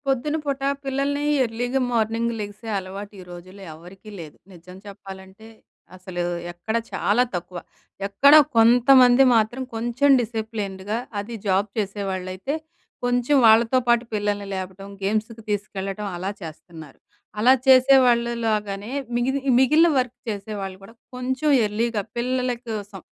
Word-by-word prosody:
పొద్దున 270 +3 0
పూట 280 -2 -3 0.2
పిల్లల్ని 275 +1 -1 0.2
ఎర్లీగా 245 +3 -2
మార్నింగ్ 230 0 0
లెగిసే 210 +2 -7
అలవాటు 195 +2 -7
ఈ - - -10
రోజుల్లో 185 +3 -12
ఎవరికీ 180 +6 -14
లేదు. 155 -3 -10 0.2
నిజం 180 +1 -13
చెప్పాలంటే 195 +1 -12 0.5
అసలు 185 -1 -5 0.3
ఎక్కడా 220 +7 -3
చాలా 220 +5 +2
తక్కువ. 175 +1 -6 0.5
ఎక్కడ 270 +9 +5 0.2
కొంతమంది 245 +2 +6
మాత్రం 225 +3 +1
కొంచెం 240 +5 0
డిసిప్లిన్డ్‌గా 215 -3 -4 0.2
అది 210 +4 -7
జాబ్ 195 +1 +1
చేసేవాళ్ళైతే, 195 +2 -3 0.5
కొంచెం 245 +3 +1
వాళ్ళతో 225 +3 +5
పాటు 240 0 +3
పిల్లల్ని 205 -1 -2
లేపడం, 190 +1 -7 0.2
గేమ్స్‌కి 220 +3 -2
తీసుకెళ్లడం, 200 0 -4
అలా 190 +3 -3
చేస్తున్నారు. 160 -2 -11 0.4
అలా 250 +4 +6
చేసేవాళ్ళు 255 -2 +5 0.2
లాగానే 210 0 -2 0.3
మిగిలి 265 +3 0 0.2
మిగిలిన 305 +6 +5
వర్క్ 250 -1 -1
చేసేవాళ్ళు 200 -2 -5
కూడా 200 - -14 0.2
కొంచెం 260 +4 -1 0.2
ఎర్లీగా 215 +1 -1
పిల్లల 250 +1 -1 0.2
కోసం, 205 -3 -6
215 Hz, 120 wpm, -23 LUFS, 195-245 Hz, 0.5 s, కొంతమంది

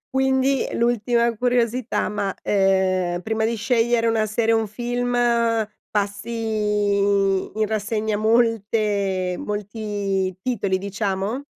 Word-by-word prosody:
Quindi, 265 0 +2
l'ultima 235 0 +1
curiosità, 245 0 0
ma, 205 -2 -2
ehm, 185 -3 +1
prima 220 +1 0
di 230 +1 0
scegliere 230 +1 +1
una 225 -1 +1
serie 225 +2 +1
o 225 - +3
un 220 - -2
film, 245 +3 -2 0.8
passi 210 0 -1
in 200 +1 +1
rassegna 215 0 -1
molte 210 -4 +1
molti 205 -3 -3
titoli, 200 -4 -1
diciamo? 200 +5 -3
215 Hz, 105 wpm, -22 LUFS, 200-230 Hz, 0.8 s, o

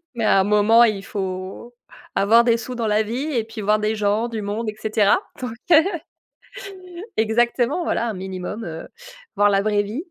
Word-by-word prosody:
mais 230 -2 -2
à 195 - +4
un - - +2
moment, 210 +3 +5
il 205 -3 0
faut 190 +4 -6 0.4
avoir 230 +4 +4
des 235 -1 +3
sous 250 +2 -7
dans 235 -2 -2
la 215 0 +2
vie 240 +6 -4
et 230 -4 0
puis 225 0 -9
voir 210 +1 +2
des 215 +1 -1
gens, 210 +2 0
du 220 -2 -5
monde 215 +3 -3
et 215 - -3
cetera, 215 -2 +2 0.2
donc 250 - -4 0.2
heu 320 0 +8 1.3
Exactement, 240 +7 +1
voilà, 235 - -1
un 220 - -3
minimum, 190 +3 -6
heu, 160 -1 -7 0.5
voir 205 0 +4
la 195 0 +2
vraie 205 -1 +1
vie. 230 - -5
215 Hz, 190 wpm, -21 LUFS, 205-235 Hz, 1.3 s, heu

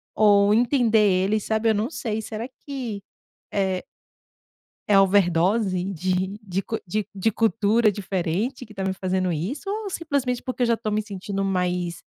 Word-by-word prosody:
ou 205 -1 +5
entender 235 -1 +3 0.3
eles, 215 +1 0
sabe? 220 +1 +1
Eu 220 - +3
não 220 +5 0
sei, 220 -7 -3
será 220 +2 -5 0.2
que, 245 -8 -5 0.5
eh 190 -2 0 1.0
é 200 -1 +6
overdose 190 0 +2
de 185 +3 -1
de 195 -1 -2
cu 225 - -3
de 210 +3 -2
de 200 +3 +1
cultura 220 0 +2
diferente 195 +6 -2
que 215 - -15
tá 195 -1 -3
me 190 - 0
fazendo 185 -1 -1
isso, 220 - -4
ou 415 -1 -3
simplesmente 280 -8 -1
porque 255 -1 -3
eu - - +4
já 230 -1 +2
tô 220 -1 -3
me 215 +1 0
sentindo 195 -1 -4
mais 180 -2 -1
205 Hz, 165 wpm, -24 LUFS, 190-230 Hz, 1.0 s, é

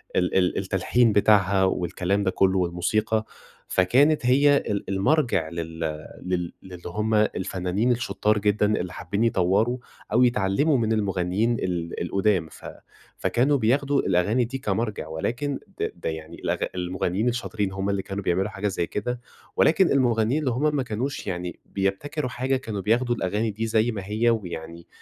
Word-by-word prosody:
ال 90 -1 +1
ال 90 -1 +2
التلحين 105 +4 +2
بتاعها 100 -2 +4
والكلام 95 +2 0
ده 95 - +1
كلّه 95 0 +2
والموسيقى، 105 +5 0 0.4
فكانت 130 +10 +3
هي 140 +3 +5
ال 100 -8 -3
المرجع 100 - +1
لل 80 0 -6 0.4
لل 90 -2 -2
للي 90 -2 -10
هم 105 +5 -2
الفنّانين 100 +1 +1
الشطار 105 -3 +1
جدًا 105 0 +2
اللي 90 0 -4
حابين 100 +5 -2
يطوروا 110 +3 +2 0.4
أو 125 +3 +5
يتعلموا 125 +5 +2
من 110 -2 +1
المغنيين 100 +2 0
ال 85 -2 -3
القدّام، 95 -1 +1
ف - - -14 0.5
فكانوا 140 +4 +2
بياخدوا 140 +4 +2
الأغاني 100 +7 +2
دي 130 +4 -5
كمرجع؛ 105 -4 -1
ولكن 120 - -3 0.2
ده - - -1
ده 85 - -4
يعني 80 +1 -7
الأغ - - -2 0.2
المغنيين 90 +4 -1
الشاطرين 110 -5 -2
همّ 95 +1 -2
اللي 100 -1 0
كانوا 100 +1 -5
بيعملوا 95 +3 +1
حاجة 105 0 -3
زي 95 -4 -1
كده، 120 +4 -3 0.3
ولكن 175 +3 +4
المغنيين 120 0 +2
اللي 140 -5 0
همّ 150 +5 +1
ما 135 - +1
كانوش 125 +3 -4
يعني 90 -2 -4
بيبتكروا 125 +9 -2
حاجة 130 +2 -1
كانوا 110 -6 -5
بياخدوا 120 +4 +1
الأغاني 105 +2 -1
دي 110 +3 -3
زي 110 +1 +2
ما 105 -3 -4
هي، 110 +4 +1
ويعني 85 -6 -4
105 Hz, 155 wpm, -25 LUFS, 95-120 Hz, 0.5 s, هي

